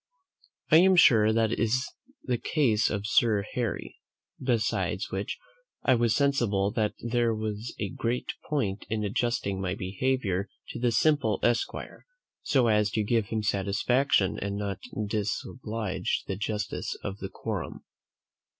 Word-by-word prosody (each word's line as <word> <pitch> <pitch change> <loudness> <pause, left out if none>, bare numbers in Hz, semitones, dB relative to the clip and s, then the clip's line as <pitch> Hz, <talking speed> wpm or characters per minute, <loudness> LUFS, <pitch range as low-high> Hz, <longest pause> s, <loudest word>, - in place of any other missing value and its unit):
I 155 - +9
am 185 +2 +6
sure 110 -10 +6
that 110 0 +2
is 120 +3 +1 0.4
the 125 -3 -1
case 115 -9 +2
of 105 -1 -3
Sir 105 -2 +3
Harry. 120 -3 -3 0.4
Besides 120 -4 0
which, - - -3 0.5
I 130 - +4
was 120 -2 +2
sensible 115 -9 +2
that 105 -1 0
there 120 -1 +1
was 110 +1 -4
a 100 - -2
great 120 +5 -2 0.2
point 105 -10 -1
in 110 0 -1
adjusting 100 -2 -1
my 95 0 -1
behaviour 100 -1 -1 0.2
to - - -6
the 120 0 +2
simple 135 -4 +2
esquire, 120 -1 -1 0.3
so 130 -4 +2
as 105 -2 +3
to 110 - +1
give 110 -1 +1
him 110 0 -2
satisfaction 100 +3 +1
and 100 0 -3
not 100 -2 -3 0.3
disoblige 110 0 -2
the 95 - -3
justice 105 +1 -3
of 100 0 -5
the 95 - -5
quorum. - - -5
110 Hz, 140 wpm, -28 LUFS, 100-120 Hz, 0.5 s, I